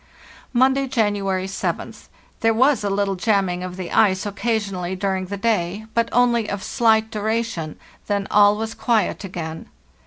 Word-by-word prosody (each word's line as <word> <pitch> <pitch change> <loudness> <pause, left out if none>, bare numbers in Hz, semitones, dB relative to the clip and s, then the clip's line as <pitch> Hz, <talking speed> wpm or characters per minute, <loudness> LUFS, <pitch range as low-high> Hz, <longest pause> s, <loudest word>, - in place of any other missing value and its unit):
"Monday, 265 +2 +3
January 205 -6 0
7th. 195 - -4 0.3
There 225 0 +2
was 260 +1 +3
a 200 - 0
little 200 0 0
jamming 190 -2 0
of 180 0 -6
the 185 -2 -6
ice 190 -3 +3
occasionally 200 -4 -2
during 190 -1 -2
the 200 +2 -4
day, 205 -1 -1
but 230 0 +1
only 235 -2 +2
of 200 -1 -4
slight 220 -2 +2
duration, 215 -7 -2 0.3
then 200 -1 0
all 205 0 +5
was 220 +1 -3
quiet 225 -3 0
again. 165 -4 -6
205 Hz, 150 wpm, -22 LUFS, 190-225 Hz, 0.3 s, all